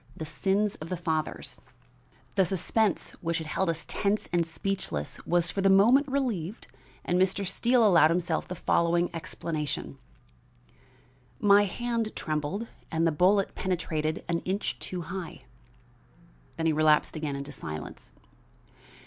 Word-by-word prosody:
THE 160 - -4
SINS 195 +6 0
OF 155 - -8
THE 180 - -2
FATHERS 160 -2 -3 0.7
The 195 - +4
suspense 190 +2 +1
which 170 -1 -1
had 160 - -4
held 175 +4 -1
us 165 -2 -3
tense 205 +1 0
and 175 -1 +3
speechless 165 - -4
was 175 -1 +2
for 195 - -2
the 195 - +4
moment 235 +9 +6
relieved 230 - -2 0.4
and 180 +1 +2
Mr. 190 +1 +1
Steele 240 +4 +3
allowed 170 -6 +6
himself 170 -1 0
the 180 - -5
following 170 +1 +1
explanation: 160 -2 -4 1.4
"My 205 0 +6
hand 230 +2 -2
trembled 155 +8 -2 0.2
and 165 +1 +1
the 165 - +3
bullet 185 +5 +3
penetrated 160 -4 -2
an 170 -1 0
inch 190 +4 -3
too 180 -2 -4
high." 180 +1 -7 1.1
Then 165 - -1
he 160 - +3
relapsed 155 0 +3
again 150 -3 -3
into 140 +1 -6
silence. 75 - -8
175 Hz, 140 wpm, -28 LUFS, 160-200 Hz, 1.4 s, moment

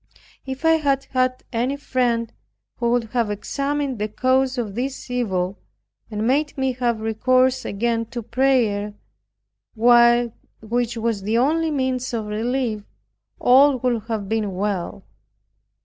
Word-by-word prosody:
If 265 +4 -5
I 325 0 +5
had 275 -3 +1
had 255 -1 0
any 245 +4 0
friend, 235 -4 -1 0.4
who 235 -1 0
would 240 0 +2
have 235 -4 0
examined 275 +4 -2
the 210 - -1
cause 260 +4 +1
of 220 -5 -3
this 260 +3 -4
evil, 195 -6 -1 0.5
and 215 0 -3
made 285 +5 +1
me 265 -1 +1
have 240 -3 -1
recourse 255 +4 +2
again 230 +2 -1
to 235 0 -6
prayer, 230 -4 +1 0.8
which 235 0 +2
was 225 -2 -1
the 215 +4 0
only 320 +6 +2
means 260 -4 -1
of 220 -2 -3
relief, 225 +1 -2 0.6
all 270 +2 +5
would 240 -3 -1
have 220 -4 -3
been 210 -3 -1
well. 200 0 -3
240 Hz, 135 wpm, -22 LUFS, 220-260 Hz, 0.8 s, I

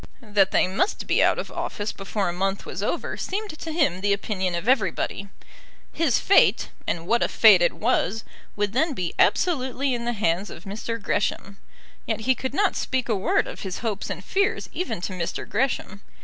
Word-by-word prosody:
That 205 -3 +3
they - - +3
must 195 - -1
be - - +2
out - - +3
of - - -5
office 205 0 -3
before 195 +1 -3
a 175 - -1
month 195 +2 -2
was - - -5
over - - -2
seemed 415 +1 -3
to 315 +1 -7
him 285 - +1
the 200 0 +2
opinion 190 -3 -2
of 170 +6 -4
everybody. 200 -4 0 0.6
His 310 -7 +2
fate, 395 - +4 0.2
and 165 -1 -2
what 235 +6 +2
a - - +3
fate - - +6
it - - +3
was! 225 - 0 0.3
would 205 0 -1
then 300 +3 +1
be 180 -5 -3
absolutely 270 -5 +2
in 235 -1 -3
the 240 - 0
hands 195 -2 0
of - - -10
Mr. 215 +3 -4
Gresham. 200 -1 -2 0.5
Yet - - -1
he 260 +4 +3
could 260 +2 -5
not 405 +2 +2
speak 255 -2 -1
a 220 - +2
word 190 - +1
of - - -8
his 190 -2 -5
hopes 210 -3 -2
and - - -6
fears 400 +1 0
even 360 - -3
to 185 - -4
Mr. 175 -2 -4
Gresham. 210 -3 -1
215 Hz, 195 wpm, -24 LUFS, 195-265 Hz, 0.6 s, fate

